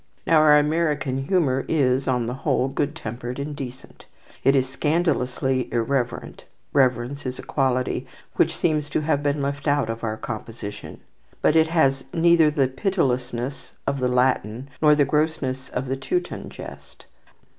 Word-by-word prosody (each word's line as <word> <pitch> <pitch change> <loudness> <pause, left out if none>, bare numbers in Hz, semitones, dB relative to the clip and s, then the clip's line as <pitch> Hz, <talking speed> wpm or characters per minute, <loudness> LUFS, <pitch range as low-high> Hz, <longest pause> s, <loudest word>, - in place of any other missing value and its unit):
Now 165 - +4
our 150 -1 +7
American 150 -3 0
humour 140 -9 +2
is, 135 -4 +1
on 125 -3 +1
the 120 - -3
whole, 130 -1 0
good 145 +2 -2
tempered 120 -2 -6
and 145 +1 -4
decent. 130 -2 -9 0.4
It 135 - +5
is 130 -1 +2
scandalously 130 -4 0
irreverent 120 +1 -2 0.3
(reverence 130 0 +1
is 130 -1 -4
a - - -8
quality 130 -2 0 0.3
which - - +2
seems 155 -3 0
to 145 - 0
have 150 -2 +1
been 145 0 0
left 140 +1 -3
out 145 -5 +2
of 115 +1 -7
our 110 -1 -2
composition); 110 -1 -7 0.4
but 155 - +4
it 160 0 +5
has 135 -5 +2
neither 165 -1 +5
the 145 -3 +2
pitilessness 130 -4 -2
of 140 - -1
the 130 - +1
Latin, 125 -1 0
nor 150 -1 +6
the 145 -1 +3
grossness 150 -3 -1
of 130 +1 -3
the 135 +1 -2
Teuton 355 - -3
jest. - - -11
135 Hz, 155 wpm, -23 LUFS, 125-150 Hz, 0.4 s, our